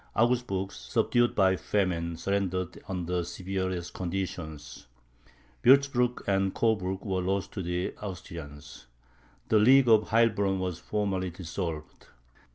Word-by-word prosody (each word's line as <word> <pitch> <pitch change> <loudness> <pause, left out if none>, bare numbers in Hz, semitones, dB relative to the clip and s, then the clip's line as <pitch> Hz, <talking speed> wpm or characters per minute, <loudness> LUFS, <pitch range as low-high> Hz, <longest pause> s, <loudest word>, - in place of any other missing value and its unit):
Augsburg, 115 -5 +1
subdued 120 0 +1
by 95 -2 +4
famine, 85 -4 -1
surrendered 95 -2 -2
under 90 -1 -2
the 90 - 0
severest 95 0 -4
conditions; 85 -7 -5 0.8
Wurtzburg 130 -2 +4
and 95 -1 +1
Coburg 100 -4 0
were 95 -2 -1
lost 95 +1 -1
to 100 - -4
the 90 +1 -2
Austrians. 75 -9 -9 0.6
The 110 - +5
League 130 +4 +6
of 110 -2 +5
Heilbronn 110 -4 +2
was 90 -2 -3
formally 100 -3 -2
dissolved. 85 -2 -6
95 Hz, 115 wpm, -28 LUFS, 90-105 Hz, 0.8 s, League